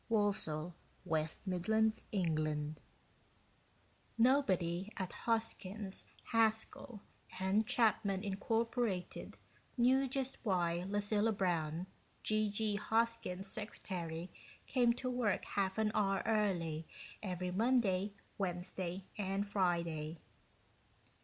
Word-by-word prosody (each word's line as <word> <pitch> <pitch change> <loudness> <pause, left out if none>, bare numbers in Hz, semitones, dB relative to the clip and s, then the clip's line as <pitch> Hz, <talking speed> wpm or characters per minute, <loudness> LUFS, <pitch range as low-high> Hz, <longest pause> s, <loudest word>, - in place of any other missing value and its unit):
ILLUSTRATED 195 -7 +1 0.7
BY 205 +4 +2
SCHELLING 155 -8 -1 1.4
Nobody 195 -8 +3
at 185 -2 -3
Hoskins, 215 -3 -2 0.3
Haskell 220 0 +1 0.4
& 195 +4 +3
Chapman, 215 -5 +2
Incorporated, 225 -1 -1 0.4
knew 260 +3 +4
jut 265 0 -2
why 175 -4 +1
Lucilla 205 +2 +2
Brown, 175 -4 0 0.4
G.G. 215 0 +1
Hoskins' 220 -4 0
secretary, 180 -4 -4 0.3
came 245 -3 +4
to 255 +2 -4
work 245 -6 +1
half 195 0 0
an 215 -1 +2
hour 195 -2 +2
early 175 -8 +1 0.3
every 180 -2 -2
Monday, 210 -2 +2 0.3
Wednesday, 180 0 -3
and 195 +1 0
Friday. 170 -5 0
200 Hz, 85 wpm, -36 LUFS, 180-220 Hz, 1.4 s, knew